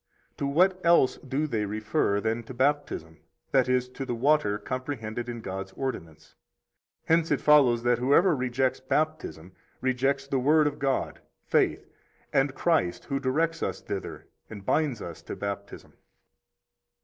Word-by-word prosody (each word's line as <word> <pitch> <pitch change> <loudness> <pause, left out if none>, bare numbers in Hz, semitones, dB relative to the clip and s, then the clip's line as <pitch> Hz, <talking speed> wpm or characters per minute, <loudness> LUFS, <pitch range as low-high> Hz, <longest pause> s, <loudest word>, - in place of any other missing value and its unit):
To 140 - -1
what 185 +6 +2
else 170 -6 +4
do 135 +3 -2
they 110 -8 -1
refer 105 -1 0
than 110 +2 -1
to 130 - -9
Baptism, 130 - -1 0.3
that 130 -2 +3
is, 125 0 +2
to 135 - -6
the 125 -2 -3
water 120 -5 +2
comprehended 120 0 -5
in 120 -1 -5
God's 95 -1 -6
ordinance? 80 - -6 0.7
Hence 165 0 +2
it 145 - +2
follows 130 -6 +5
that 120 -1 +2
whoever 145 +7 +4
rejects 130 0 0
Baptism 130 - -2 0.3
rejects 135 +2 0
the 135 -1 -1
Word 150 +4 +4
of 145 -1 -2
God, 135 -1 -1 0.2
faith, - - +1 0.5
and 135 0 +2
Christ, 160 - +1
who 140 -1 -2
directs 160 +5 0
us 95 0 -2
thither 100 -2 -6 0.2
and 100 -3 -9
binds 145 -8 0
us 85 -2 -8
to - - -7
Baptism. 100 0 -6
130 Hz, 150 wpm, -27 LUFS, 110-145 Hz, 0.7 s, follows